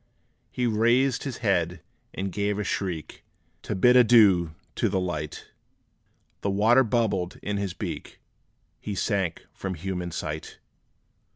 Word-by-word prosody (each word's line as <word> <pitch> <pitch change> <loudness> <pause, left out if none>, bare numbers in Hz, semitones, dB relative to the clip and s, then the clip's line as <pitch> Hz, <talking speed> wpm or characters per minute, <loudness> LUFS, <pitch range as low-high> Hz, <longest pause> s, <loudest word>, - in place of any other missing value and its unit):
He 125 - -2
raised 120 +4 +2
his 135 -4 -4
head, 90 -3 +1 0.3
and 95 0 -4
gave 100 +1 -1
a 105 - -1
shriek, 90 -6 -4 0.4
To - - -4
bid 125 +6 +5
adieu 105 -9 +6 0.2
to 115 - 0
light: 90 -6 -3 0.9
The 100 - -1
water 110 +6 +4
bubbled 105 -6 0
in 105 0 -2
his 100 -3 -3
beak - - -6 0.6
He 105 - -5
sank 95 -4 -1
from 95 -1 -4
human 90 +1 -4
sight! 80 -2 -5
100 Hz, 125 wpm, -26 LUFS, 90-115 Hz, 0.9 s, adieu